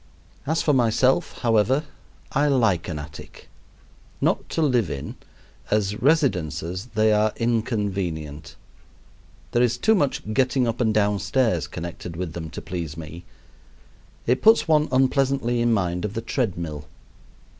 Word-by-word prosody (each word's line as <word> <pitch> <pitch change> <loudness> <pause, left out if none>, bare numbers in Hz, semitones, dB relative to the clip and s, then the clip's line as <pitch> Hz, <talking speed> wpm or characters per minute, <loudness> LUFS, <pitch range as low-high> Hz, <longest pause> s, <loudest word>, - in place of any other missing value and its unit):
As 160 +2 +1
for 150 - +3
myself, 125 +1 +2
however, 120 +5 +3 0.5
I 145 +1 +2
like 115 - +2
an 80 - -4
attic. 75 0 -10 0.7
Not - - 0
to 165 - 0
live 125 - +2
in: 70 - -5 0.5
as 105 -1 0
residences 90 - 0
they 110 0 +4
are 105 0 +3
inconvenient. 100 - -2 1.0
There 120 - +2
is 120 -1 +2
too 220 - +3
much 140 - 0
getting 130 0 +2
up 115 +2 -2
and 110 -2 +2
down 105 -1 +2
stairs 100 - +1
connected 85 0 -7
with 85 -2 -4
them 80 -2 -6
to - - -8
please 85 -3 -5
me. 80 +2 -9 1.0
It 125 +2 +1
puts 220 -1 +5
one 155 -1 +3
unpleasantly 130 -2 +2
in 120 0 +2
mind 90 -5 0
of 105 0 -4
the 115 - -2
tread 115 -5 -2
mill. 75 -4 -6
110 Hz, 145 wpm, -24 LUFS, 85-130 Hz, 1.0 s, puts